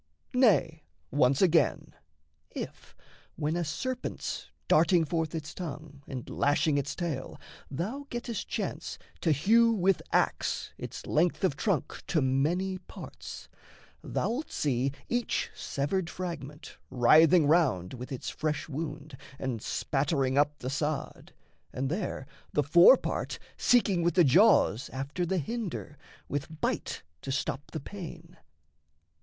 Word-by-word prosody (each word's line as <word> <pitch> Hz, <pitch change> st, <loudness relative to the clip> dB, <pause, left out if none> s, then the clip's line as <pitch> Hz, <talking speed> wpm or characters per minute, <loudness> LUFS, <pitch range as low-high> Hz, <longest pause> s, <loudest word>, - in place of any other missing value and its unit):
Nay, 195 Hz, -11 st, +3 dB, 0.3 s
once 135 Hz, +2 st, +3 dB
again: 170 Hz, -3 st, +2 dB, 0.6 s
If, -, -, -8 dB, 0.4 s
when 155 Hz, +1 st, -1 dB
a 175 Hz, -, 0 dB
serpent's 255 Hz, -, -4 dB, 0.2 s
darting 165 Hz, +2 st, +4 dB
forth 160 Hz, 0 st, -2 dB
its 155 Hz, -1 st, -5 dB
tongue, 155 Hz, -4 st, -7 dB
And 130 Hz, -3 st, -6 dB
lashing 145 Hz, +1 st, +2 dB
its 140 Hz, -, -3 dB
tail, 160 Hz, -7 st, -4 dB, 0.3 s
thou 220 Hz, -, -4 dB
gettest 240 Hz, -2 st, -4 dB
chance -, -, -4 dB, 0.2 s
to 165 Hz, -, +2 dB
hew 230 Hz, -, +5 dB
With 195 Hz, -3 st, +2 dB
axe -, -, 0 dB
its -, -, -7 dB
length 170 Hz, +5 st, +1 dB
of 180 Hz, -7 st, +2 dB
trunk 180 Hz, -, -1 dB
to 165 Hz, -, +2 dB
many 160 Hz, +8 st, +1 dB
parts, -, -, -10 dB, 0.6 s
Thou'lt 260 Hz, +7 st, -2 dB
see 135 Hz, -2 st, 0 dB, 0.2 s
each 240 Hz, -1 st, -1 dB
severed 165 Hz, +6 st, -2 dB
fragment 160 Hz, -4 st, -7 dB
writhing 155 Hz, +6 st, +6 dB
round 140 Hz, -, +2 dB
With 125 Hz, +1 st, -7 dB
its 130 Hz, -, -5 dB
fresh 155 Hz, -1 st, -2 dB
wound, 150 Hz, -1 st, -5 dB, 0.2 s
and 125 Hz, -5 st, -3 dB
spattering 135 Hz, 0 st, 0 dB
up 145 Hz, +1 st, +2 dB
the 130 Hz, -, -4 dB
sod, 150 Hz, 0 st, -3 dB, 0.4 s
And 135 Hz, +2 st, -2 dB
there 175 Hz, -7 st, -3 dB, 0.3 s
the 150 Hz, -, +2 dB
fore 170 Hz, -, +8 dB
part -, -, -3 dB, 0.2 s
seeking 205 Hz, -7 st, +3 dB
with 170 Hz, 0 st, +1 dB
the 180 Hz, -, +7 dB
jaws 145 Hz, -, +5 dB
After 140 Hz, +7 st, -3 dB
the 190 Hz, -, 0 dB
hinder, 180 Hz, -, -4 dB, 0.3 s
with 145 Hz, +3 st, -4 dB
bite -, -, -2 dB, 0.2 s
to 135 Hz, -, -4 dB
stop 140 Hz, 0 st, -2 dB
the 160 Hz, -, -5 dB
pain. 170 Hz, 0 st, -9 dB
155 Hz, 130 wpm, -29 LUFS, 140-180 Hz, 0.6 s, fore